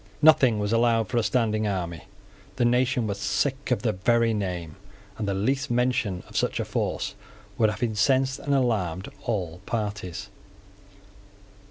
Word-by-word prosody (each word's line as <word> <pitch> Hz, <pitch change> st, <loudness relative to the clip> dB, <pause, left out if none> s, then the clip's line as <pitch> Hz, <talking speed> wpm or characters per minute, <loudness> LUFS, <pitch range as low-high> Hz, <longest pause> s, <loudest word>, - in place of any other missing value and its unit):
Nothing 150 Hz, -8 st, +6 dB
was 105 Hz, +1 st, -1 dB
allowed 115 Hz, -3 st, +3 dB
for 120 Hz, -, -1 dB
a -, -, 0 dB
standing 110 Hz, -3 st, +1 dB
army. 85 Hz, -5 st, -3 dB, 0.5 s
The 120 Hz, -, +1 dB
nation 125 Hz, 0 st, +2 dB
was 100 Hz, -1 st, -3 dB
sick 100 Hz, +8 st, -1 dB
of 120 Hz, -5 st, 0 dB
the 115 Hz, -, +2 dB
very 115 Hz, +4 st, +2 dB
name; 90 Hz, -6 st, -3 dB, 0.4 s
and 105 Hz, -, -2 dB
the 100 Hz, -, 0 dB
least 135 Hz, +8 st, 0 dB
mention 120 Hz, -6 st, 0 dB
of -, -, -15 dB
such -, -, 0 dB
a -, -, -1 dB
force -, -, -2 dB, 0.5 s
would 110 Hz, -2 st, +5 dB
have 105 Hz, +3 st, -4 dB
incensed 130 Hz, +4 st, +2 dB
and 140 Hz, -1 st, 0 dB
alarmed 100 Hz, -8 st, 0 dB, 0.2 s
all 90 Hz, -7 st, -2 dB
parties. 105 Hz, -4 st, -3 dB
110 Hz, 155 wpm, -26 LUFS, 100-125 Hz, 0.5 s, Nothing